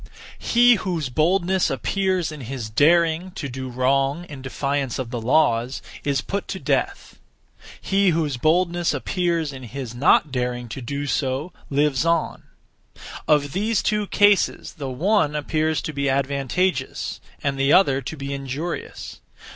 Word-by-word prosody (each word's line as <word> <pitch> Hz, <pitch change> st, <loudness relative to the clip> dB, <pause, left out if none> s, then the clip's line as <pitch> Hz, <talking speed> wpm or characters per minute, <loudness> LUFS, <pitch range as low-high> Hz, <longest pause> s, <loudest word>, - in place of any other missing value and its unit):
He 240 Hz, 0 st, +5 dB
whose 170 Hz, -7 st, -2 dB
boldness 180 Hz, +6 st, +2 dB
appears 185 Hz, -, 0 dB
in 150 Hz, -2 st, -8 dB
his 120 Hz, -3 st, -6 dB
daring 165 Hz, +6 st, +3 dB
(to 145 Hz, -, -5 dB
do 130 Hz, 0 st, -6 dB
wrong, 135 Hz, +5 st, +1 dB
in 145 Hz, -5 st, -10 dB
defiance 140 Hz, 0 st, -2 dB
of 125 Hz, -3 st, -4 dB
the 120 Hz, -3 st, -3 dB
laws) 125 Hz, -1 st, +2 dB, 0.2 s
is 140 Hz, -1 st, 0 dB
put 200 Hz, +1 st, -4 dB
to -, -, -5 dB
death; -, -, -2 dB, 0.6 s
he 195 Hz, 0 st, +2 dB
whose 155 Hz, -5 st, 0 dB
boldness 170 Hz, +4 st, +1 dB
appears 170 Hz, 0 st, -1 dB
in 130 Hz, -, -9 dB
his 125 Hz, -1 st, -7 dB
not 140 Hz, +3 st, +3 dB
daring 125 Hz, -1 st, -2 dB
(to 130 Hz, -, -6 dB
do 140 Hz, +4 st, -4 dB
so) 135 Hz, +4 st, -2 dB, 0.2 s
lives 145 Hz, -1 st, +2 dB
on. 165 Hz, -1 st, 0 dB, 0.9 s
Of 145 Hz, -2 st, +3 dB
these 210 Hz, +3 st, 0 dB
two 210 Hz, -1 st, 0 dB
cases 205 Hz, -1 st, +3 dB
the 140 Hz, -5 st, -6 dB
one 155 Hz, +3 st, +1 dB
appears 155 Hz, +1 st, 0 dB
to 155 Hz, -, -4 dB
be 140 Hz, -1 st, 0 dB
advantageous, 140 Hz, +3 st, -1 dB, 0.2 s
and 140 Hz, -1 st, -1 dB
the 135 Hz, +1 st, +3 dB
other 140 Hz, -8 st, +4 dB
to 160 Hz, -, -6 dB
be 140 Hz, 0 st, -4 dB
injurious. 140 Hz, +5 st, -5 dB
145 Hz, 145 wpm, -23 LUFS, 135-175 Hz, 0.9 s, He